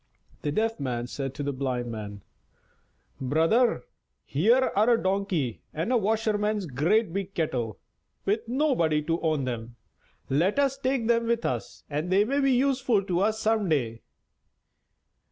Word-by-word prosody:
The 145 - -1
Deaf 225 +6 0
Man 120 -3 -2
said 135 +1 -5
to 145 - -4
the 140 0 -2
Blind 125 -3 -2
Man: 105 -3 -7 1.0
"Brother, 165 - +2 0.4
here 230 - +3
are 215 +4 +4
a 235 - +5
Donkey 185 - -1
and 165 +11 -1
a - - +5
washerman's 215 -1 0
great 165 - +1
big 195 0 -4
kettle, 120 - -1 0.5
with 215 +3 0
nobody 235 - +1
to 165 +2 -1
own 155 -4 +1
them! 120 -1 -5 0.5
Let 170 - +1
us 275 -1 +1
take 260 -3 0
them 230 0 +2
with 235 0 0
us - - -3
they 180 +7 +1
may 275 +5 0
be 275 -1 +3
useful 255 -5 +2
to 180 -2 -1
us 215 +3 +1
some 215 -3 +1
day." 115 -7 0
190 Hz, 150 wpm, -27 LUFS, 140-225 Hz, 1.0 s, a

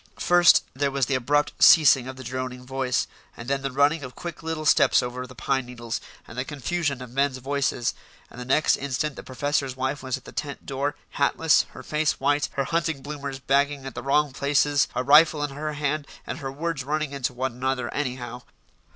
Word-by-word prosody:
First, 175 -1 +5
there 140 +1 0
was 135 -1 0
the 140 - -2
abrupt 145 +4 +1
ceasing 140 -5 +7
of 130 - -6
the 130 - -9
droning 125 0 -5
voice, 130 -1 -1 0.3
and 115 - -8
then 135 0 0
the 135 - -2
running 145 +4 +2
of 130 -2 -8
quick 170 -2 -7
little 160 -1 -4
steps - - +5
over 125 +1 -5
the 130 - -13
pine 130 +1 -1
needles, 120 -2 -5 0.3
and 110 - -11
the 125 - -2
confusion 145 -1 -2
of 125 - -11
men's 135 0 +1
voices; 135 -2 -1 0.4
and 125 - -9
the - - -6
next 135 +4 +3
instant 140 +2 -2
the - - -7
professor's 140 0 -2
wife 130 +2 -2
was 130 -1 -2
at 130 - -17
the - - -10
tent 145 -2 -5
door, 140 +2 -2 0.2
hatless, 155 +3 +3
her - - -10
face 150 0 0
white, 145 0 +1
her 140 - 0
hunting 165 -2 -1
bloomers 140 -2 -5
bagging 140 +1 +1
at 135 - -6
the - - -6
wrong 140 +1 +1
places, 140 +1 +2
a 125 - 0
rifle 150 +2 +6
in 145 - -2
her 150 +2 -4
hand, 145 0 -2 0.2
and 140 - -5
her 135 -2 -5
words 150 0 -3
running 155 +1 -2
into 140 -3 -2
one 130 +2 -2
another 125 0 -2
anyhow. 125 -3 -4
140 Hz, 205 wpm, -25 LUFS, 130-145 Hz, 0.4 s, ceasing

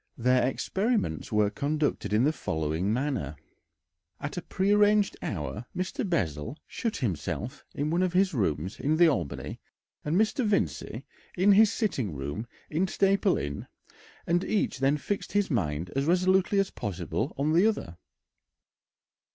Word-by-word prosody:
Their 125 +1 +3
experiments 195 - -1
were 105 -1 +3
conducted 150 +2 -1
in 105 +3 +3
the 150 +3 +3
following 80 - -1
manner: 125 - -1 0.8
At 140 +1 -5
a 180 - -3
prearranged 205 +2 +3
hour 75 - -4
Mr. 185 +2 -2
Bessel 85 - -1
shut 230 -2 -3
himself 115 - -3
in 150 +2 -1
one 170 +2 +2
of 185 -1 +1
his 190 0 +3
rooms 95 - -1
in 155 +3 +1
the 170 0 +7
Albany 90 - -2 0.4
and 150 +3 -1
Mr. 220 +6 +2
Vincey 210 -2 -1 0.3
in 190 +3 +5
his 210 +1 +6
sitting 130 - -1
room 70 - -4 0.2
in 170 +5 0
Staple 195 +1 +2
Inn, 70 0 -4 0.6
and 175 +2 +2
each 205 -10 0
then 135 +2 +3
fixed 200 +7 -4
his 205 -3 +1
mind 85 - -1
as 135 +1 +1
resolutely 185 +3 +3
as 195 -1 +2
possible 95 - -3
on 145 +3 +1
the 180 +6 +5
other. 85 - -3
145 Hz, 145 wpm, -28 LUFS, -, 0.8 s, the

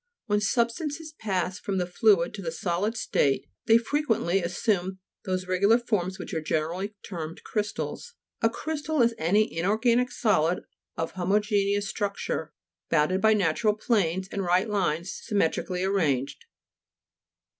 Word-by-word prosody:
When 210 -2 +1
substances 290 +9 -1
pass 190 -3 -1
from 195 -1 -2
the 180 - +1
fluid 180 -1 +3
to 210 - -6
the 165 -3 -3
solid 180 +7 -1
state, 140 -10 +1 0.2
they 225 - +7
frequently 230 - +1
as 175 +1 -3
sume 190 -4 0 0.3
those 185 -1 -1
regular 195 +5 +4
forms 190 -6 -1
which - - -7
are 160 - -1
generally 170 +7 -2
termed 165 -3 -6
crystals. 215 - -4 0.3
A 225 - +4
crystal 305 +1 -1
is 235 0 +3
any 200 +6 +2
inorganic 230 +8 +2
solid 175 -5 +1 0.3
of 165 - -2
homogeneous 200 +2 +1
structure, 200 -6 -3 0.4
bounded 165 +5 +2
by 220 0 +5
natural 205 +3 +2
planes 190 -5 0
and 200 - -3
right 180 +3 +2
lines 180 -4 -1
sym 210 - -3
metrically 180 +1 0
arranged. 155 - 0
195 Hz, 140 wpm, -27 LUFS, 175-220 Hz, 0.4 s, they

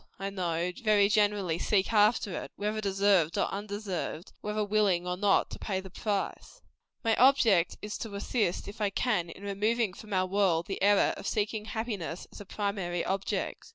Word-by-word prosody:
I 195 0 -4
know, 175 -2 -1
very 205 -2 +4
generally 205 -5 +2
seek 200 +3 +1
after 210 0 +3
it, - - -9
whether 210 +1 -2
deserved 195 -4 +2
or - - +2
undeserved; 200 -5 -4
and - - -34
whether 210 0 -1
willing 200 -4 +2
or 180 0 -1
not 195 +1 +2
to - - -7
pay 190 -3 -2
the 190 -1 -10
price. 210 - -3 0.4
My 225 -1 +3
object 230 -9 +4
is 210 0 -5
to 215 -3 -6
assist, 200 -2 -1
if 205 +2 -9
I 205 - +2
can, 195 -5 0
in 195 - -11
removing 210 +1 0
from 215 +2 -12
our 185 -1 +2
world 185 -3 +1
the 195 - -5
error 205 0 +4
of - - -6
seeking 210 0 -1
happiness 215 -7 -4
as - - -10
a - - -9
primary 195 -4 -2
object. 195 +1 -2
200 Hz, 185 wpm, -29 LUFS, 185-210 Hz, 0.4 s, very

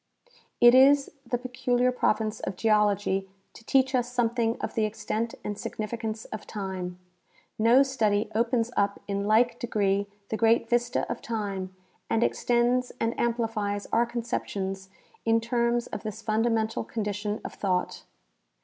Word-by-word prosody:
It 240 0 +8
is 275 +2 +6 0.2
the 245 - 0
peculiar 250 0 0
province 220 -3 0
of - - -4
geology 205 -2 +2 0.2
to - - -14
teach 265 +2 +2
us 245 -1 0
something 235 -1 0
of - - -4
the 220 - +1
extent 220 +1 -3
and 205 - -3
significance 220 +1 -4
of 215 -1 -7
time. 190 -3 -5 0.6
No 235 +5 +6
study 220 -6 +1
ojDens 230 +1 +1
up 200 0 +1
in 200 0 -2
like 235 +2 +3
degree 200 -3 0 0.2
the 220 - -1
great 230 +1 +3
vista 240 +1 0
of - - -4
time 200 -5 -4 0.3
and 225 +1 +2
extends 245 +1 +1
and 230 +1 0
amplifies 225 -4 -1
our 235 +1 +3
conceptions 195 -5 -4 0.3
in 225 0 +3
terms 235 0 0
of - - -6
this 215 0 -6
fundamental 220 0 0
condition 210 -1 -3
of - - -5
thought. 185 -3 -1
225 Hz, 140 wpm, -27 LUFS, 205-240 Hz, 0.6 s, It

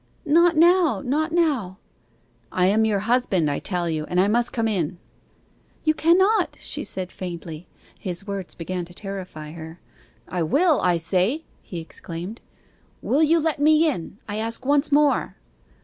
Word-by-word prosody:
'Not 335 +2 +4
now 335 - +4
not 310 +5 0
now.' 280 - 0 0.7
'I 180 - +2
am 215 +4 +3
your 205 -3 +1
husband, 210 - +1
I 145 - -2
tell 175 -3 -2
you, 155 -2 -2
and 180 - -1
I 190 - +4
must 235 +3 +1
come 225 -2 0
in.' 180 -6 -1 0.9
'You 310 - +3
cannot,' 375 +8 +3
she - - -3
said 185 -1 -3
faintly. 170 -2 -7 0.3
His 180 0 -5
words 200 -3 -5
began 180 +1 -4
to 175 +1 -14
terrify 185 -7 -7
her. 160 +1 -9 0.5
'I 180 - -3
will, 300 - +3
I 180 -1 +2
say!' 185 - 0 0.2
he 175 - -7
exclaimed. 170 +5 -8 0.6
'Will 290 - +2
you 320 +2 +4
let 315 -2 -1
me 310 +2 +5
in, 195 - -3
I 205 0 -4
ask 230 +3 -4
once 290 +2 +2
more? 290 0 +2
205 Hz, 160 wpm, -23 LUFS, -, 0.9 s, me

